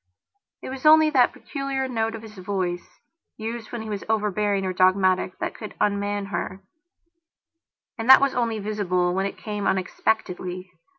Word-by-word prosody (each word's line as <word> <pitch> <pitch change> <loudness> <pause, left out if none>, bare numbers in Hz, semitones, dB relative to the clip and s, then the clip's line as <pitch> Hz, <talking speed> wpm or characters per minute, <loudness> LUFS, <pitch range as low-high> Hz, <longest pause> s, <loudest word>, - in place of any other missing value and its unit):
It - - -5
was 265 0 -7
only 310 0 +7
that 255 -4 +4
peculiar 275 -2 -4
note 225 -3 -1
of 225 - -9
his 215 -1 -11
voice, 185 -2 -3 0.4
used 225 0 -6
when 235 -2 -5
he - - -8
was 200 -1 -4
overbearing 210 -2 0
or 185 - -1
dogmatic, 185 0 +2
that - - -3
could 215 - -9
unman 205 0 0
herand 175 +2 -3 1.5
that 265 - +10
was 275 -1 +2
only 230 -2 0
visible 195 -4 0
when 190 +1 0
it - - -8
came 210 -2 -4
unexpectedly. 185 -1 -2
205 Hz, 155 wpm, -24 LUFS, 185-230 Hz, 1.5 s, that